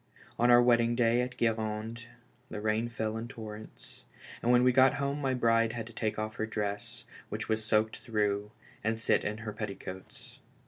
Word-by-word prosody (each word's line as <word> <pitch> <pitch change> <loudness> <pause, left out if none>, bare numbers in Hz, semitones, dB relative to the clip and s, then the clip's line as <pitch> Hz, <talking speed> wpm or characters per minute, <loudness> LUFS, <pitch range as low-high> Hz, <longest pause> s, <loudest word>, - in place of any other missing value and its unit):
On 120 +1 +4
our 120 0 +8
wedding 120 -1 +4
day 120 0 +3
at 125 0 -4
Guerande 110 0 -1 0.4
the 105 - -5
rain 110 +2 0
fell 110 -1 -2
in 115 +1 -5
torrents, 110 -3 -9 0.4
and 120 - +2
when 125 0 +6
w'e 125 0 +5
got 130 +1 +6
home 140 +1 -2
my 135 -2 +1
bride 115 -2 +3
had 115 -2 -4
to 115 - -12
take 110 -1 -2
off 110 0 -3
her 110 - -1
dress, 105 -2 -3 0.3
which - - -4
was 110 0 0
soaked 110 0 +1
through, 105 -2 -1 0.3
and 110 +1 0
sit 115 - +2
in 105 +1 -2
her 105 - -4
petticoats. 95 -2 -8
115 Hz, 185 wpm, -31 LUFS, 110-120 Hz, 0.4 s, our